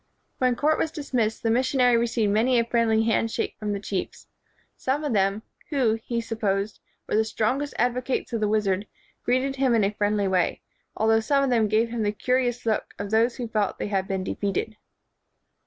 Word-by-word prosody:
When 255 -1 +2
court 305 +5 +2
was 320 - +1
dismissed, 250 -8 -2
the 225 - +2
mission 255 +3 +1
ary 245 -1 +5
received 230 -3 +1
many 240 +4 +3
a 235 - +3
friendly 230 -2 +2
hand 225 0 +1
shake - - -3
from 210 -2 -2
the 200 - -2
chiefs. 195 -2 -4 0.5
Some 275 +4 -1
of 290 -5 -1
them, 195 +1 +1 0.3
who, 245 -7 +1
he 235 -1 -2
supposed, 210 -3 -2 0.3
were - - -1
the 220 - +4
strongest 255 +6 -1
advocates 250 +1 -1
of 230 - 0
the 210 - +2
wizard, 205 -2 0 0.4
greeted 265 +2 0
him 260 -3 +3
in 220 - +3
a 200 +1 +1
friendly 205 -1 0
way, 185 -2 +1 0.4
although 225 0 +3
some 275 +5 +2
of 270 - +1
them 225 -3 +3
gave 220 +2 +2
him 235 -1 -3
the 205 -1 +1
curi 250 +4 +1
ous 245 0 -4
look 220 -2 -1
of 200 0 -5
those 230 +2 +3
who 245 -3 -4
felt 215 -3 -1
they - - -3
had 195 -2 -1
been 190 -1 -2
de - - -3
feated. 200 +2 -2
225 Hz, 205 wpm, -25 LUFS, 210-250 Hz, 0.5 s, ary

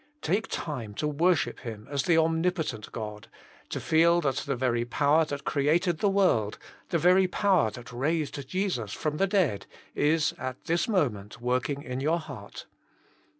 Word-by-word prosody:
Take 200 +7 0
time 115 -9 -5
to 150 - -1
worship 165 +3 +1
Him 110 -4 -8
as 140 -1 -1
the 165 +3 +3
om 160 0 +2
nipotent 170 - -2
God, 105 -2 -6 0.4
to - - -3
feel 170 +1 +4
that 135 -4 0
the 140 - -2
very 120 -2 0
power 145 +6 +3
that 145 -2 -5
created 160 +4 +1
the 205 - +3
world, 180 - +2 0.3
the 170 - +1
very 180 +3 +5
power 185 - +2
that 120 +3 -10
raised 140 +1 -2
Jesus 180 - -2
from 150 -1 -2
the 195 - +2
dead, 180 - +1 0.3
is 155 +1 +2
at 130 0 -5
this 170 0 0
moment 120 - -1
working 130 +4 -1
in 125 +1 -4
your 155 +5 +1
heart. 160 - -9
150 Hz, 165 wpm, -28 LUFS, 125-170 Hz, 0.4 s, very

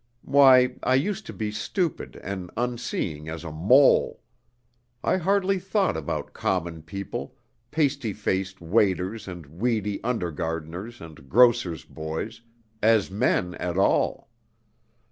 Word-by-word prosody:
Why, 130 -3 +6
I 130 - +2
used 200 +9 -1
to - - -5
be 110 -2 -3
stupid 145 - -2
and 95 -2 -5
unseeing 115 -11 -3
as 80 0 -6
a 85 - -6
mole! 105 - +4 0.8
I - - +2
hardly 195 +1 +1
thought 195 +1 0
about 80 -2 -4
common 85 -3 -2
people, 100 +5 -6 0.3
pasty 140 -6 0
faced 95 -2 -2
waiters 95 +3 +1
and 90 -3 -7
weedy 105 - -2
under 115 -8 -1
gardeners 80 +8 -5
and 75 -5 -12
grocer's 100 - +4
boys, 80 +9 -5 0.4
as 110 -3 +3
men 95 -4 +1
at 90 0 -3
all. 95 - +1
105 Hz, 125 wpm, -25 LUFS, 85-125 Hz, 0.8 s, Why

